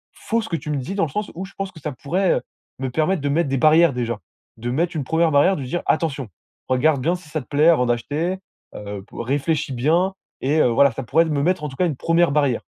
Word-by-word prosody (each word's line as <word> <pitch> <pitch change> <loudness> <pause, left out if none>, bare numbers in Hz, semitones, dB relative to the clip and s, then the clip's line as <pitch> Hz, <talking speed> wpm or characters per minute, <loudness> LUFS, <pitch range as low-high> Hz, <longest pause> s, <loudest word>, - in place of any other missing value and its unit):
faux 230 +1 -1
ce - - -6
que 165 - -1
tu 155 - -8
me 145 - 0
dis, 135 +8 -4
dans 200 -4 +2
le - - -6
sens 210 0 -3
où 185 - -5
je 195 - -14
pense 195 -1 -3
que 160 - -13
ça 150 - -3
pourrait, 175 +8 0
heu, - - -1 0.4
me 130 - -2
permettre 160 +5 +1
de 145 - 0
mettre 150 -1 +1
des 135 - 0
barrières 155 +2 +5
déjà. 120 -3 -2 0.4
De 120 +2 -4
mettre 170 +6 0
une 150 - -1
1ère 160 +1 +2
barrière, 145 +7 +4
de 140 - -4
dire: 130 +7 -3
«Attention! 140 -7 0 0.4
Regarde 135 +2 +2
bien 170 +7 +1
si 175 -4 -12
ça 155 0 -3
te - - -17
plaît 150 +3 +4
avant 155 -7 +4
d'acheter, 150 +10 -1 0.4
heu, 100 -1 -7
p - - -18
réfléchis 140 +3 -1
bien» 165 +10 +2 0.3
et 145 +4 +1
heu, - - +4
voilà, 140 +4 +4
ça 135 - -5
pourrait 165 +8 +3
me 150 -3 -1
mettre 180 -1 +1
en 150 - -2
tout 135 - -10
cas 180 - +2
une 155 - -2
1ère 165 0 +2
barrière. 140 -5 +1
150 Hz, 265 wpm, -22 LUFS, 135-170 Hz, 0.4 s, barrières